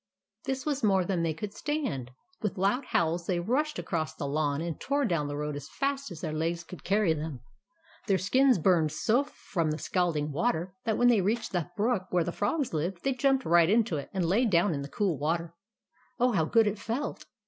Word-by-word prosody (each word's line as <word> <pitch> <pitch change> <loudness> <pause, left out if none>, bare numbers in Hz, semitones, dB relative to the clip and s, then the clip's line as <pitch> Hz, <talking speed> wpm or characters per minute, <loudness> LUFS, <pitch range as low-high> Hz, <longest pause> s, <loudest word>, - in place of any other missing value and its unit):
This 265 -1 -2
was 285 -2 -1
more 190 -3 +3
than 180 -2 0
they 165 -2 0
could 200 +5 -5
stand. 265 - -3 0.3
With 210 -3 -2
loud 200 +8 +1
howls, 170 +1 0
they 180 -2 +1
rushed 275 - 0
across 155 -1 -2
the 145 - -4
lawn, 145 0 0
and 165 -1 -4
tore 280 0 +1
down 165 -8 0
the 145 0 -4
road 150 0 -3
as 145 +1 -7
fast 275 0 -2
as 170 -4 -9
their 155 -3 -3
legs 165 +2 -1
could 180 +1 -11
carry 200 -3 +2
them. 150 -5 -5 0.7
Their 195 -3 +3
skins 255 +8 +4
burned 165 -3 +3
so 225 - +2
from 170 - -3
the 155 - -1
scalding 160 -5 0
water 175 - -1
that, 220 -2 +1
when 245 0 +5
they 225 -5 +4
reached 225 +4 -1
the 175 -2 -2
brook 210 -3 +1
where 180 -2 +2
the 175 - -3
Frogs 235 - -1
lived, 170 +3 -2
they 270 - +1
jumped 270 +1 +2
right 170 0 +5
into 215 -6 +2
it, 140 - -6
and 185 -3 -1
lay 195 +9 +3
down 180 -4 +3
in 140 - -3
the 140 - -6
cool 185 -6 0
water. 165 +3 -1 0.7
Oh, 250 +1 +4
how 165 -8 +2
good 225 +6 +4
it 205 0 -1
felt 240 +8 -4
185 Hz, 215 wpm, -29 LUFS, 160-230 Hz, 0.7 s, when